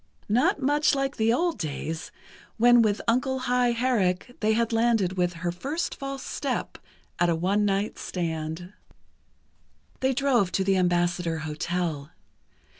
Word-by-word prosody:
Not 245 Hz, +6 st, +2 dB
much 290 Hz, +2 st, +2 dB
like 275 Hz, 0 st, -2 dB
the 220 Hz, +1 st, +3 dB
old 340 Hz, +7 st, 0 dB
days, 160 Hz, 0 st, -4 dB, 0.5 s
when 240 Hz, +1 st, +6 dB
with 215 Hz, -2 st, +1 dB
Uncle 255 Hz, +3 st, +1 dB
High 250 Hz, -1 st, +1 dB
Herrick, 235 Hz, -3 st, 0 dB
they 215 Hz, 0 st, +2 dB
had 230 Hz, +1 st, 0 dB
landed 225 Hz, -5 st, +2 dB
with 180 Hz, -1 st, 0 dB
"Her 175 Hz, +1 st, -3 dB
First 280 Hz, -, -3 dB
False 275 Hz, -1 st, -6 dB
Step" -, -, -3 dB, 0.4 s
at 175 Hz, -, +3 dB
a 170 Hz, -, +2 dB
one 195 Hz, +5 st, +1 dB
night 200 Hz, +1 st, -1 dB
stand. 165 Hz, +1 st, -4 dB, 1.3 s
They 265 Hz, 0 st, +1 dB
drove 250 Hz, -9 st, +2 dB
to 190 Hz, -, +1 dB
the 195 Hz, 0 st, +2 dB
Ambassador 175 Hz, -2 st, +1 dB
Hotel. 155 Hz, -1 st, -3 dB
210 Hz, 140 wpm, -26 LUFS, 175-250 Hz, 1.3 s, when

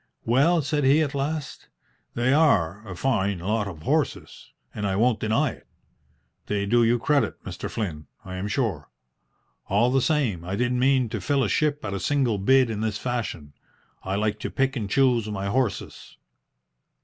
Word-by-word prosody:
"Well," 145 Hz, +8 st, +3 dB
said 145 Hz, +1 st, -1 dB
he, 140 Hz, +4 st, +4 dB
at 145 Hz, -1 st, -3 dB
last, 145 Hz, +2 st, -4 dB, 0.5 s
"they 120 Hz, +3 st, +2 dB
are 105 Hz, -, +3 dB
a 90 Hz, -, -6 dB
fine 100 Hz, -3 st, 0 dB
lot 105 Hz, +4 st, -1 dB
of 80 Hz, -5 st, -9 dB
horses, -, -, -2 dB, 0.2 s
and 105 Hz, -1 st, -3 dB
I 95 Hz, -, -1 dB
won't 115 Hz, +2 st, +2 dB
deny 120 Hz, +6 st, +1 dB
it. -, -, -16 dB, 0.8 s
They 100 Hz, -1 st, -1 dB
do 120 Hz, +3 st, +3 dB
you 115 Hz, +1 st, +3 dB
credit, 140 Hz, +4 st, 0 dB
Mr. -, -, -6 dB
Flynn, 80 Hz, -9 st, -4 dB, 0.2 s
I 95 Hz, 0 st, -6 dB
am 95 Hz, +3 st, -3 dB
sure. 100 Hz, -, -2 dB, 0.8 s
All 115 Hz, +6 st, +3 dB
the 135 Hz, 0 st, +3 dB
same 125 Hz, -, 0 dB
I 90 Hz, +3 st, -3 dB
didn't 125 Hz, +2 st, 0 dB
mean 130 Hz, -1 st, +3 dB
to -, -, -4 dB
fill 140 Hz, -2 st, +1 dB
a -, -, +1 dB
ship 150 Hz, -4 st, 0 dB
at 100 Hz, -, -3 dB
a 100 Hz, -, -2 dB
single 125 Hz, -1 st, +1 dB
bid 130 Hz, +4 st, +4 dB
in 105 Hz, -1 st, -3 dB
this 110 Hz, -2 st, -1 dB
fashion. 110 Hz, -, -4 dB, 0.5 s
I 95 Hz, +1 st, -3 dB
like 105 Hz, +1 st, -1 dB
to -, -, -4 dB
pick 135 Hz, 0 st, 0 dB
and 105 Hz, -5 st, -3 dB
choose 125 Hz, -3 st, +2 dB
my 100 Hz, -2 st, -4 dB
horses." 120 Hz, +2 st, -2 dB
115 Hz, 180 wpm, -25 LUFS, 100-135 Hz, 0.8 s, he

